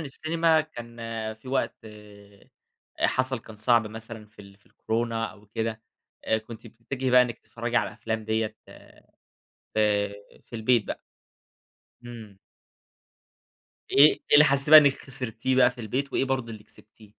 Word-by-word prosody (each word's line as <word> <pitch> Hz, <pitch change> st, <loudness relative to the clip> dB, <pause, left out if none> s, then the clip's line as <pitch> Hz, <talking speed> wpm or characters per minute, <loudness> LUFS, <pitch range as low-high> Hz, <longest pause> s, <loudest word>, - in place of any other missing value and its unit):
السينما 160 Hz, +2 st, +1 dB
كان 120 Hz, -6 st, -10 dB, 0.4 s
في 110 Hz, +4 st, -15 dB
وقت 130 Hz, -3 st, -1 dB
أ 105 Hz, -2 st, -9 dB
حصل 130 Hz, -1 st, -1 dB
كان 110 Hz, -1 st, -14 dB
صعب 115 Hz, 0 st, +2 dB
مثلًا 110 Hz, 0 st, -9 dB
في 105 Hz, -1 st, -16 dB
ال 100 Hz, 0 st, -16 dB
في 105 Hz, -, -34 dB
الكورونا 115 Hz, 0 st, -2 dB
أو 105 Hz, 0 st, -19 dB
كده، 110 Hz, +1 st, -4 dB, 0.4 s
آآ 110 Hz, -, +1 dB
كنتِ 115 Hz, +1 st, -12 dB
بتتّجهي 125 Hz, +4 st, -5 dB
بقى 125 Hz, 0 st, +7 dB
إنِّك 120 Hz, -2 st, -4 dB
تتفرّجي 120 Hz, 0 st, -5 dB
على -, -, +2 dB
الأفلام 110 Hz, -1 st, -5 dB
ديّة 110 Hz, 0 st, -2 dB, 1.2 s
في 105 Hz, -1 st, +1 dB, 0.4 s
في 115 Hz, -, -10 dB
البيت 115 Hz, 0 st, +2 dB
بقى. -, -, -6 dB, 1.0 s
إمم. 110 Hz, -5 st, -11 dB, 1.5 s
إيه 145 Hz, +2 st, +8 dB
إيه -, -, -9 dB
اللي 150 Hz, +1 st, +8 dB
حسّيتِ 140 Hz, 0 st, +1 dB
بقى 155 Hz, -, +12 dB
إنّك 145 Hz, -2 st, +5 dB
خسرتيه 130 Hz, -1 st, -3 dB
بقى 125 Hz, -1 st, +5 dB
في 125 Hz, 0 st, -12 dB
البيت 130 Hz, +6 st, -3 dB
وإيه -, -, +1 dB
برضه 130 Hz, -4 st, -2 dB
اللي 105 Hz, -1 st, -11 dB
كسبتيه؟ 105 Hz, 0 st, -19 dB
115 Hz, 150 wpm, -26 LUFS, 110-130 Hz, 1.5 s, بقى